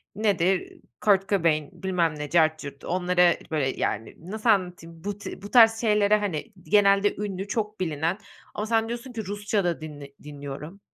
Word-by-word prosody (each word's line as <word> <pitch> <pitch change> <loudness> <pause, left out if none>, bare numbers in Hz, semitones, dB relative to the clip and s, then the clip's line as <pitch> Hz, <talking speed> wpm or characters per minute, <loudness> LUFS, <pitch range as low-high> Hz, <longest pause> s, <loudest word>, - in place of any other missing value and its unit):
Nedir? 195 -3 0 0.2
Kurt 195 -2 +3
Cobain, 165 -6 +1
bilmem 175 -4 +1
ne, 150 - -4
cart 155 -1 +3
curt, 140 -2 -9
onlara, 180 -1 +3 0.2
böyle, 145 -4 +1
yani, 110 -3 -3 0.2
nasıl 220 +2 -1
anlatayım? 175 -5 0
Bu 205 0 -3
ti 205 - -8
bu 205 - -9
tarz 225 -2 +6
şeylere, 210 -2 +3
hani, 205 +2 -4
genelde 205 -1 +4
ünlü, 200 -1 -4
çok 210 -1 -3
bilinen 165 0 -1 0.4
Ama 210 - -3
sen 225 0 +1
diyorsun 240 +2 -6
ki: 220 -3 -5
"Rusça 205 +1 -1
da 175 -2 -1
dinle 145 -3 -9
dinliyorum." 145 +5 -8
190 Hz, 165 wpm, -26 LUFS, 160-210 Hz, 0.4 s, tarz